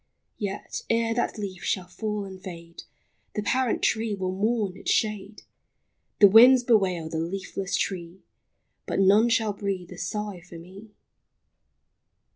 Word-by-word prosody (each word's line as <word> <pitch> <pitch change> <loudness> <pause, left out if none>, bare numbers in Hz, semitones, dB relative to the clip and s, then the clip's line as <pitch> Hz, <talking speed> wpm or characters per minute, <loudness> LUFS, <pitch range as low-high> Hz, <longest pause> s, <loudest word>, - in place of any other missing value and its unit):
Yet, 200 -1 -4
ere 230 0 +1
that 235 0 -1
leaf 190 -4 -6
shall 185 -3 -1
fall 210 +3 -4
and 190 -1 -10
fade, 170 -2 -10 0.5
The 210 - -2
parent 255 +2 0
tree 220 -1 +1
will 185 -1 -3
mourn 205 0 -1
its - - -6
shade, 210 -1 -1 0.8
The 205 - +9
winds 245 +5 +7
bewail 190 -9 +2
the 160 0 -3
leafless 190 +3 -4
tree,— 175 -1 -4 0.6
But - - -1
none 205 +4 +5
shall 225 -3 +1
breathe 195 -3 -4
a 180 - -9
sigh 205 +1 -4
for 175 -1 -12
me 190 +6 -13
200 Hz, 140 wpm, -26 LUFS, 185-220 Hz, 0.8 s, The